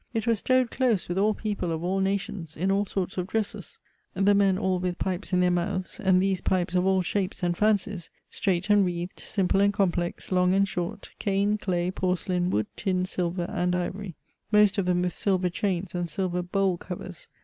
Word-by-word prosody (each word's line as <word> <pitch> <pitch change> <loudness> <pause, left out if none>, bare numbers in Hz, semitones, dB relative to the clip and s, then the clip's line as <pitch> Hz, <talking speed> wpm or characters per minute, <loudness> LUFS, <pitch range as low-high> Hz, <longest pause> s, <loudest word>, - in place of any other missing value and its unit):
It 225 -1 0
was 230 -3 +2
stowed 255 0 +2
close 240 -8 +1
with 175 +2 -1
all 210 +1 +3
people 205 -5 -3
of 165 0 -3
all 190 +2 0
nations, 190 -4 -2
in 190 +4 +1
all 200 +1 +1
sorts 190 -1 -3
of 180 - -2
dresses; 210 -4 -3 0.4
the 195 +2 +4
men 200 -2 +3
all 190 -2 0
with 180 0 -2
pipes 190 +1 -2
in 180 -1 +3
their 180 0 +3
mouths, 185 +4 -2
and 190 -4 +4
these 190 -1 +1
pipes 180 -2 0
of 180 +1 +2
all 190 -1 +3
shapes 190 +1 -2
and 175 -1 +1
fancies 205 -3 0 0.2
straight 190 +1 0
and 205 -1 +6
wreathed, 175 0 -3
simple 195 -1 +1
and 200 0 +3
complex, 175 -3 -1
long 180 0 +3
and 195 +1 +3
short, 180 +1 -4
cane, 200 +1 +1
clay, 180 -2 -1
porcelain, 180 -1 0
wood, 105 - +1
tin, 185 -3 0
silver, 180 -1 -2
and 180 0 0
ivory; 180 0 -4 0.4
most 210 -1 +5
of 185 - 0
them 180 0 +2
with 180 - -1
silver 185 -2 +1
chains 185 0 -2
and 175 -1 -2
silver 180 +1 -1
bole 185 0 0
covers. 180 0 -8
185 Hz, 200 wpm, -27 LUFS, 180-200 Hz, 0.4 s, and